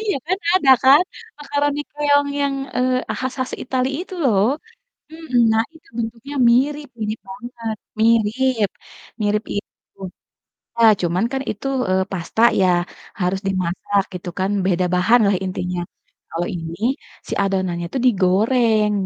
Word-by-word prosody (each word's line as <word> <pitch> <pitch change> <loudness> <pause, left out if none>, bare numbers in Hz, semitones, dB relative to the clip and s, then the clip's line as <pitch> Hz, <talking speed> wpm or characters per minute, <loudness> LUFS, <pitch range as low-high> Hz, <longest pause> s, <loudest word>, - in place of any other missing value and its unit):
Iya, 425 -3 -1
kan 375 +3 0 0.2
ada 310 -8 +4
kan, 275 +6 +7 0.4
makaroni 290 0 -1
keong 285 -1 +2
yang, 280 -1 +1 0.2
eee, 255 0 0
khas-khas 260 0 -3
Italy 255 0 0
itu 375 - -9
lho, 270 - +4 0.8
mhm. 320 -6 -2
Nah, 220 0 +3
itu 320 - -19
bentuknya 235 +5 -5 0.2
mirip, 285 +4 +1
mirip 215 +1 -2
banget, 230 0 -6 1.5
mirip 210 0 +1
itu. 205 - -9 0.8
Iya, 230 - +3 0.2
cuman 175 +5 +1
kan 270 0 -1
itu, 210 - -6 0.2
eee, 185 0 +2
pasta 190 +5 -2 0.2
ya, 185 - +4 0.5
harus 185 +1 0
dimasak 190 +2 0
gitu 180 0 -6
kan, 190 +1 0 0.2
beda 185 -1 +2
bahan 225 +7 +4
lah, 200 - +2
intinya. 180 -1 -3 0.5
Kalau 175 +1 -2
ini 165 0 -6 0.5
si - - -7
adonannya 185 -3 -1
tuh 265 - 0
digoreng, 215 +2 +3
225 Hz, 130 wpm, -20 LUFS, 190-270 Hz, 1.5 s, kan